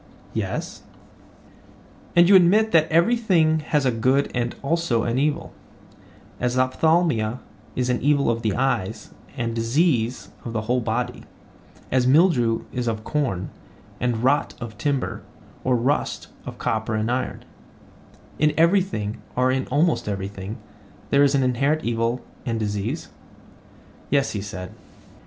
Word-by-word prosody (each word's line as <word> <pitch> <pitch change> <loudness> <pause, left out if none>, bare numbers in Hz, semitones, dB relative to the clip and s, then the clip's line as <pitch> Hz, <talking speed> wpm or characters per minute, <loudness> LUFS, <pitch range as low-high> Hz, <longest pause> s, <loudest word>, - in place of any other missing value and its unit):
Yes. - - -4 1.3
And 175 0 +7
you 200 - +7
admit 205 +5 +5
that 160 -1 +3
every 170 +9 +4
thing 165 -9 +2
has 150 -2 0
a 130 - +3
good 130 +5 +1
and 120 -1 -1
also 140 -6 +1
an 120 +2 0
evil; 145 +1 -1 0.9
as 125 +1 0
ophthalmia 130 -3 +2 0.4
is 125 0 0
the 125 - +1
evil 145 -1 +2
of 115 0 -2
the 110 -4 0
eyes 115 -6 -1 0.3
and 115 -2 -2
disease 120 +1 0
of 115 - -6
the 110 - -1
whole 120 +4 0
body; 115 +2 -3 0.7
as 125 -1 +2
mildew 130 -7 +3
is 125 -1 -2
of 110 -1 -2
corn, 115 -13 -2 0.5
and 120 -1 -1
rot 140 +3 +2
of 120 -3 -7
timber, 140 -3 -1 0.4
or 130 -1 +2
rust 130 +5 -1 0.2
of - - -7
copper 110 0 -1
and 110 +2 0
iron: 130 +1 -3 0.9
in 150 0 +3
everything, 165 - +1
or 125 +1 +2
in 130 0 -1
almost 155 -6 +1
everything, 100 +1 -5 0.5
there 140 - +5
is 140 0 +4
an 135 - +2
inherent 140 +5 +1
evil 115 +1 -1 0.2
and 115 -2 -2
disease? 105 - -3 1.0
Yes, 140 0 +2
he 105 - -3
said. 90 -2 -7
125 Hz, 140 wpm, -23 LUFS, 115-150 Hz, 1.3 s, And